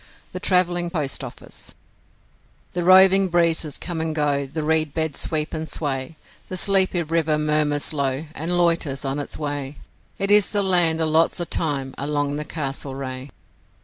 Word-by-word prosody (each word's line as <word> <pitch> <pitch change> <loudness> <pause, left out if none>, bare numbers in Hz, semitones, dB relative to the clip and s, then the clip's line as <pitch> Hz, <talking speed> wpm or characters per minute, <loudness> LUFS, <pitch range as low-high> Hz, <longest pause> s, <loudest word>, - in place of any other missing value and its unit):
The - - -5
Travelling 175 -2 +2
Post 150 -6 -2
Office - - -10 1.0
The 175 - -2
roving 190 +1 +6
breezes 165 -4 +1
come 170 -2 -4
and 160 -1 -2
go, 145 -2 0
the 155 +3 -4
reed 155 -1 0
beds 160 -3 -2
sweep 155 -2 -1
and 160 0 -4
sway, 140 0 -3 0.3
The 185 - -4
sleepy 190 -2 +2
river 160 -1 0
murmurs 150 -1 +1
low, 140 0 -1
and 165 +4 -1
loiters 165 -6 +1
on 135 +2 -1
its 145 - -5
way, 145 -2 -4 0.4
It 195 +1 -1
is 205 -1 +5
the 205 -1 0
land 175 -4 +2
of 160 - +1
lots 160 +3 +2
o' - - -1
time 140 -6 -2
along 145 0 -1
the 150 - -4
Castlereagh. 135 -3 -5
155 Hz, 160 wpm, -22 LUFS, 145-175 Hz, 1.0 s, roving